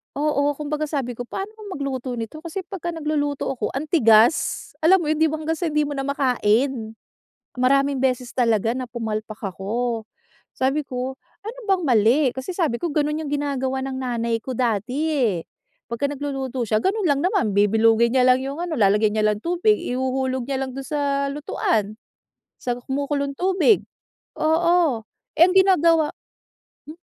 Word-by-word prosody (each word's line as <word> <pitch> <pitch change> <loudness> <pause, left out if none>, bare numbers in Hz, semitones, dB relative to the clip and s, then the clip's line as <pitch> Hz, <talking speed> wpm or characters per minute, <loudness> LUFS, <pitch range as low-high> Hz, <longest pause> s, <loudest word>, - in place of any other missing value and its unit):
Oo, 290 0 +1
kumbaga 300 +1 -2
sabi 275 -6 -3
ko, 245 - -5
"Paano 390 - -6
ba 435 - -12
magluto 265 -4 -4
nito?" 310 +9 -7
kasi 335 +3 -5
pagka 345 -3 -4
nagluluto 295 -3 -2
ako 270 - -2
ang 285 +4 -4
tigas. 230 -3 +3
Alam 375 +3 +6
mo 330 - -3
yun 310 - +2
tipong 315 0 0
hanggang 325 - +1
sa 330 -2 -2
hindi 300 -1 +1
mo 290 - -4
na 270 - -2
makain. 250 -3 +1 0.6
Maraming 275 +1 +2
beses 250 -2 0
talaga 230 -3 +2
na 255 -1 -4
pumalpak 215 -2 -4
ako. 220 +4 -3 0.5
Sabi 275 +3 0
ko, 255 +1 -4 0.2
"Ano 470 +3 -7
bang 380 -2 +2
mali?" 240 +2 +4
kasi 265 +8 -6
sabi 300 -10 0
ko, 345 - -1
"Ganun 300 +1 0
yung 305 - -5
ginagawa 265 -2 -2
ng 270 - -4
nanay 235 -2 -1
ko 255 -1 -6
dati 240 +1 -1 0.2
eh." 235 - +1 0.5
Pagka 235 +5 -2
nagluluto 270 -3 -3
siya, 215 0 +1
ganun 400 - 0
lang 285 -4 +2
naman 365 - +1
bibilugin 225 +4 +3
niya 250 - +5
lang 255 0 +5
yung 275 +2 -4
ano, 345 -1 -4
lalagyan 210 +1 +3
niya 215 0 +2
lang 210 -1 0
tubig. 355 +5 +2
Ihuhulog 260 0 -2
niya 270 -1 -1
lang 260 - -7
dun 270 +1 -6
sa 280 -2 0
lutuan, 225 -7 -2 0.6
sa 245 -1 -2
kumukulong 280 +2 -2
tubig. 380 +5 +3 0.6
Oo. 320 -5 +2 0.4
Eh - - +7
ang - - +1
ginagawa 335 -5 +4 0.7
Hmm, 315 - -9
270 Hz, 165 wpm, -22 LUFS, 240-305 Hz, 0.7 s, Eh